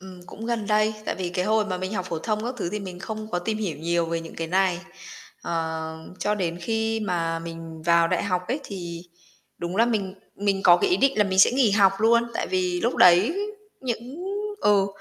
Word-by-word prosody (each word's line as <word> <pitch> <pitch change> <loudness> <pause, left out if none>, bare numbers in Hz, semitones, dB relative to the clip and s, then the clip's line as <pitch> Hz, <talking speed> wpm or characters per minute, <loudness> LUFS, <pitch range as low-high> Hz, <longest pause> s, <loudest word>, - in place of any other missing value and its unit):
Ừm, 185 -1 -11
cũng 225 - -8
gần 230 -3 -1
đây, 215 +1 +2
tại - - -2
vì 185 -2 -3
cái 180 +1 -1
hồi 215 +1 +2
mà 185 -3 -3
mình 185 +2 -4
học 185 -2 -2
phổ 165 - -2
thông 215 +5 -2
các 245 +2 -3
thứ 175 - -2
thì 210 - -2
mình 185 -2 -7
không 215 +3 -6
có 175 - 0
tìm 215 +5 -2
hiểu 195 -7 -3
nhiều 170 +1 0
về 165 0 -2
những 165 - -10
cái 165 - -3
này. 185 0 +1 0.6
Ờ, 160 -1 -3 0.2
cho 210 - 0
đến 175 -4 -2
khi 225 +3 -1
mà 170 -5 -1
mình 165 -1 -8
vào 170 0 +4
đại 180 -1 0
học 180 -3 0
ấy 270 +5 -1
thì 170 -4 -6 0.6
đúng 175 +2 -4
là 230 +2 +5
mình 200 -5 -1 0.2
mình 200 -1 0
có 175 -2 +8
cái 390 - +1
ý 360 - +4
định 275 -3 +2
là 210 - +5
mình 190 -1 -2
sẽ 195 - +8
nghỉ 250 -4 +3
học 195 -2 +5
luôn, 230 +2 +4
tại - - -1
vì 180 -1 0
lúc 235 - 0
đấy 185 - +6 0.4
những 255 +6 -5 0.4
ừ 200 -2 +4
190 Hz, 230 wpm, -25 LUFS, 170-215 Hz, 0.6 s, có